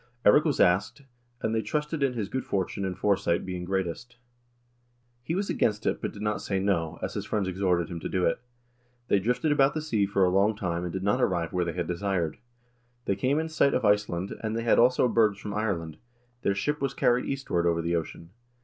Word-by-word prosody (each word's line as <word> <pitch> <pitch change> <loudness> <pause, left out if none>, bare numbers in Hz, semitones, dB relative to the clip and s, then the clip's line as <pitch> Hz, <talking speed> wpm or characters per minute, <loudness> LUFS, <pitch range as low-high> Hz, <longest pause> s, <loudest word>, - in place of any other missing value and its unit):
"Eirik 150 +9 +6
was 150 -4 0
asked, 90 +10 +2 0.4
and 110 - 0
they 110 - +1
trusted 150 +4 -2
in 135 -2 +2
his 110 -5 -3
good 130 +5 -3
fortune 100 0 -2
and 95 -1 -3
fore 100 +1 +3
sight 85 -2 -1
being 90 -1 -4
greatest. 95 +5 -3 1.1
He 160 +8 -3
was 195 +1 -1
against 105 0 0
it, - - 0
but - - -2
did 105 - -8
not 105 0 -1
say 95 -1 -1
no, 85 -5 0
as - - -3
his - - -3
friends 105 -3 -1
exhorted 90 -2 0
him 85 -2 -6
to - - -5
do 90 -1 0
it.... 85 - 0 0.7
They 100 - +4
drifted 125 +9 0
about 140 0 +3
the - - 0
sea 110 -10 +1
for 95 -1 +2
a - - +3
long 100 +3 +3
time 85 -4 -2
and 90 - -3
did 95 +2 -4
not 100 +1 +1
arrive 85 -3 0
where 90 -1 +1
they 85 - -3
had 90 -1 -2
desired. 90 -1 -2 0.7
They 100 - +1
came 130 +7 +1
in 160 +1 0
sight 160 -3 +2
of 125 - 0
Iceland, 105 -3 +1
and 110 0 -2
they 115 - -2
had 115 - +4
also 125 +1 +4
birds 110 -4 +3
from 105 0 -6
Ireland; 95 -7 -2 0.4
their 100 - +1
ship 150 +8 -1
was 135 -1 -1
carried 125 +1 +2
eastward 90 -11 -1
over 85 -1 +1
the 85 +1 0
ocean. 85 +1 -5
100 Hz, 225 wpm, -27 LUFS, 90-120 Hz, 1.1 s, Eirik